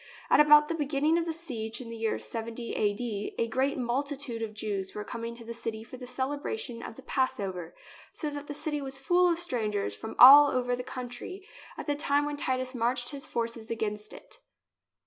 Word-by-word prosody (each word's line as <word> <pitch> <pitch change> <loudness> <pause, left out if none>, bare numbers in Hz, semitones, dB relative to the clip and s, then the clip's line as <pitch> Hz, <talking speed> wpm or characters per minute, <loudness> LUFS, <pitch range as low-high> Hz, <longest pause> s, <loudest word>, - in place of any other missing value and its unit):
At - - +6
about 300 0 +8
the 330 - -1
beginning 300 +1 +1
of 335 - -1
the 330 - -1
siege, 235 -9 -4
in 235 -3 -8
the - - -6
year 225 -1 -1
70 230 +1 -5
a.d., 210 0 -1
a 230 - +1
great 265 +5 0
multitude 265 -1 -2
of 215 -1 -4
Jews 200 -3 -3
were 210 - -3
coming 230 +1 -5
to 235 -1 -9
the 235 - -5
city 225 -1 -5
for 255 - -10
the 250 0 -8
celebration 270 - -3
of - - -8
the - - -13
Passover, 195 - -2 0.4
so 305 -2 -2
that 290 0 -6
the 290 - -4
city 295 0 -2
was 270 0 -5
full 355 +6 +3
of 340 - +1
stran 245 -11 -1
gers 200 - -2
from 220 - -7
all 285 +3 +11
over 245 -2 0
the 250 - -5
country 255 - -7 0.3
at - - -5
the 290 - +1
time 290 0 +2
when 295 0 -2
Titus 255 -2 -1
marched 245 0 0
his 280 -2 -6
forces 230 -1 -3
against 210 -2 -3
it. - - -9
250 Hz, 205 wpm, -29 LUFS, 225-290 Hz, 0.4 s, all